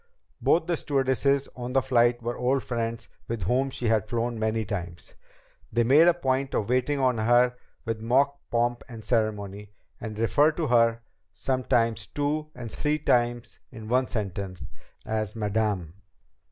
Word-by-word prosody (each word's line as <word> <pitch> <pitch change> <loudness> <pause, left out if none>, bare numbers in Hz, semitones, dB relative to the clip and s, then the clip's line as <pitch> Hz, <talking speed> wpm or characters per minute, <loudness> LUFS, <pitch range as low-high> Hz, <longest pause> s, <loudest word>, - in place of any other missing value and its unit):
Both 165 0 +3
the 170 -1 0
stewardesses 140 0 +1
on 125 0 -5
the 135 - +4
flight 120 -2 +2
were 120 +1 -2
old 130 +2 0
friends 115 -2 -3 0.2
with 115 -4 -3
whom 130 +8 +1
she 125 - -5
had 110 -2 +1
flown 120 -1 -1
many 110 0 0
times. 90 -4 -6 0.6
They 120 +2 +2
made 145 +8 +6
a 175 - +6
point 135 -4 -1
of 105 - -1
waiting 130 +3 +1
on 130 -3 +2
her 120 +2 +4 0.3
with 115 -1 -3
mock 140 +5 +2
pomp 120 0 0
and 115 -3 -9
ceremony, 105 -3 -1 0.3
and 110 -2 -6
referred 145 +7 +3
to 165 - 0
her, 115 -3 +3 0.3
sometimes 120 -3 0
two 150 +1 -2
and 115 -3 -7
three 150 0 0
times 120 -4 0
in 110 -3 -9
one 130 +1 +2
sentence, 95 -4 -4 0.4
as 110 -1 -2
"Madame." 105 -6 -1
120 Hz, 155 wpm, -26 LUFS, 110-130 Hz, 0.6 s, made